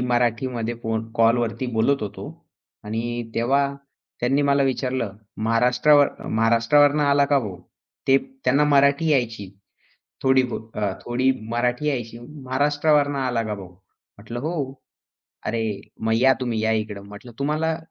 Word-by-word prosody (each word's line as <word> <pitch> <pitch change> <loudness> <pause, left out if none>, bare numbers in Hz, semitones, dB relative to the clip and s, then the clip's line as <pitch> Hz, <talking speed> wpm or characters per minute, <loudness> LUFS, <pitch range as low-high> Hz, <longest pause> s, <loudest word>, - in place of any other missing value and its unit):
मराठीमध्ये 120 -1 0
फोन 115 0 -3
कॉलवरती 115 +1 +2
बोलत 115 +5 +1
होतो 100 -1 -6 0.6
आणि 115 +2 -4
तेव्हा 135 +4 +2 0.5
त्यांनी 135 +4 +2
मला 140 0 +3
विचारलं, 130 -5 -1 0.3
"महाराष्ट्रावर 125 +6 +4 0.2
महाराष्ट्रावरून 115 +7 +3
आला 140 -1 +4
का 140 - +6
भाऊ?" 105 -8 -5 0.5
ते 135 - +7 0.3
त्यांना 140 +3 +4
मराठी 140 +2 +3
यायची 115 -8 0 0.8
थोडी-बहुत. 125 -4 +1
अ, 105 -2 0
थोडी 130 +2 +2 0.2
मराठी 120 +4 0
यायची. 120 -5 -3
"महाराष्ट्रावरून 145 +2 0
आला 125 -4 0
का 110 -1 -3
भाऊ?" 95 -3 -10 0.5
म्हटलं, 110 +4 -7
"हो." 145 -2 -3 0.7
"अरे 110 -2 -2 0.2
मग 110 0 +1
या 130 +3 +5
तुम्ही 120 -3 -1
या 110 - +2
इकडं." 105 -2 -9
म्हटलं, 105 +4 -11
"तुम्हाला 155 +3 0
125 Hz, 125 wpm, -23 LUFS, 115-140 Hz, 0.8 s, ते